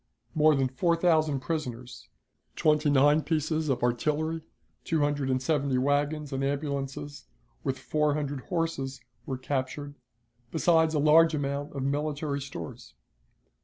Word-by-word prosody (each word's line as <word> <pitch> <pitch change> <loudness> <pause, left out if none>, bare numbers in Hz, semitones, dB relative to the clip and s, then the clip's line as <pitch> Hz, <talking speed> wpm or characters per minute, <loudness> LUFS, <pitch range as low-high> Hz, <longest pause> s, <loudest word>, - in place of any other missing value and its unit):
More 155 0 +5
than 135 -1 +2
four 170 +7 +1
thousand 155 -5 +2
prisoners, 125 -4 -5 0.5
twenty 150 -1 +3
nine 145 +2 +5
pieces 155 0 -1
of 125 -2 0
artillery, 155 +6 0 0.4
two 160 -2 0
hundred 145 -2 0
and 130 0 +2
seventy 140 -2 0
wagons 145 +2 0
and 135 0 -1
ambulances, 140 0 -3 0.4
with 135 -1 -1
four 150 -1 0
hundred 145 -2 -3
horses, 165 -7 -2 0.3
were 130 - -2
captured, 140 +2 -3 0.6
besides 160 0 +3
a - - +2
large 155 +2 +5
amount 140 0 -3
of 135 -2 -3
military 145 0 -1
stores. 135 - -8
145 Hz, 130 wpm, -28 LUFS, 135-155 Hz, 0.6 s, More